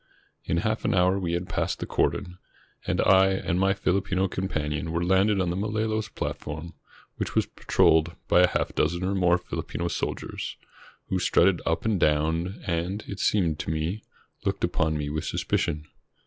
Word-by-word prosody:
In 85 - 0
half 110 0 0
an - - +1
hour 90 +1 +3
we 85 -3 -2
had 90 +1 -2
passed - - -1
the - - -4
cordon, 90 -3 -1 0.5
and - - 0
I 95 0 +6
and 95 -2 0
my 95 +1 +3
FiUpino 95 0 0
companion 80 -3 -2
were 85 +1 0
landed 95 +2 +3
on 90 -2 +1
the - - -2
Malolos 110 +2 -1
plat - - -3
form, 80 +3 -7 0.4
which - - -3
was - - +3
patrolled 80 +2 +2
by 90 - +5
a 90 - +6
half - - -1
dozen 85 +4 0
or 95 +2 0
more 90 -2 +3
Fihpino 85 -1 -4
soldiers, - - -4 0.5
who 95 - 0
strutted 90 0 +3
up 80 +3 0
and 110 -4 +1
down, 80 +5 +1
and, 90 +4 -2
it 100 - -6
seemed 85 -7 +1
to - - -4
me, 80 +7 -2 0.4
looked - - -2
upon 80 -1 +1
me 75 -1 -3
with 75 +1 -3
suspicion. 75 0 -1
90 Hz, 175 wpm, -26 LUFS, 80-95 Hz, 0.5 s, I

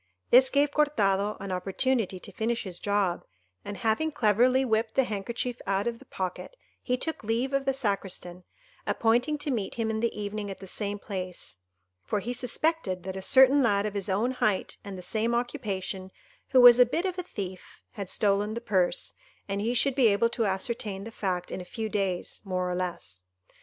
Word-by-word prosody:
This 255 +1 +8
gave 285 +1 +2
Cortado 210 -9 +1
an 195 -1 -5
opportunity 195 +2 0
to - - -10
finish 230 0 -1
his 185 -4 -6
job, 200 -4 0 0.4
and 205 -1 -6
having 245 +8 +1
cleverly 250 +3 +3
whipped 220 -1 0
the 270 - +5
handkerchief 235 +3 -3
out 195 0 +1
of 235 -1 -2
the - - -16
pocket, 185 - -5 0.3
he 250 -1 0
took 320 +1 -4
leave 235 +5 -1
of 275 0 +1
the 270 - +3
Sacristan, 195 -7 -3 0.4
appointing 245 +7 +2
to 290 0 -2
meet 220 -6 -2
him 225 -1 -1
in 220 - -2
the 230 -1 -1
evening 205 0 -4
at 195 - -6
the 195 - -10
same 205 +2 -3
place, 185 - -6 0.5
for 210 - -1
he 235 +5 -3
suspected 250 - 0
that 190 0 -5
a 190 - -4
certain 265 +6 +6
lad 205 -4 +2
of 210 - -2
his 200 0 -3
own 210 +7 +1
height 215 -6 0
and 200 -2 -7
the 180 - -8
same 225 +5 0
occupation, 200 -7 -3 0.4
who 260 - +5
was 245 0 +10
a 250 - +9
bit 335 +9 -1
of 370 -1 -2
a - - +1
thief, 190 - -8
had 200 -5 -6
stolen 205 +1 +1
the - - -2
purse, 185 -7 0 0.3
and 200 0 -2
he 235 +3 0
should 275 +3 +3
be 255 -3 +4
able 215 +2 +3
to 230 -2 0
ascertain 195 0 -2
the 225 - -8
fact 180 -5 -3
in - - -4
a - - -6
few 220 +5 -5
days, 195 -4 -2
more 185 -2 -2
or - - -1
less. 170 - -4
215 Hz, 200 wpm, -28 LUFS, 195-245 Hz, 0.5 s, was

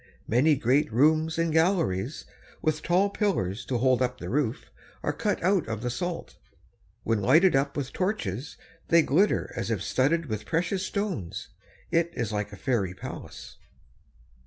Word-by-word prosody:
Many 140 +7 +4
great 135 +3 +2
rooms 155 +6 +3
and 165 -1 +1
galleries, 160 - +1 0.3
with 155 0 0
tall 190 +4 +2
pillars 120 - -1
to 125 - -1
hold 130 +1 +2
up 125 0 0
the - - -6
roof, 135 -2 -1 0.3
are - - 0
cut 210 -5 -1
out 185 - +2
of 110 0 -4
the 125 - -1
salt. 170 +7 -4 0.7
When 115 -2 0
lighted 165 - +5
up 140 +1 0
with 135 -2 -3
torches, 160 - -2 0.3
they 165 -1 +5
glitter 180 +11 +2
as - - -3
if 105 -4 -1
studded 145 +9 +1
with 110 -6 -5
precious 180 +3 0
stones. 190 - -3 0.4
It 170 0 +2
is 110 -2 -2
like 105 0 -2
a 100 - -9
fairy 100 -9 -1
palace. - - -9
145 Hz, 160 wpm, -27 LUFS, 115-170 Hz, 0.7 s, lighted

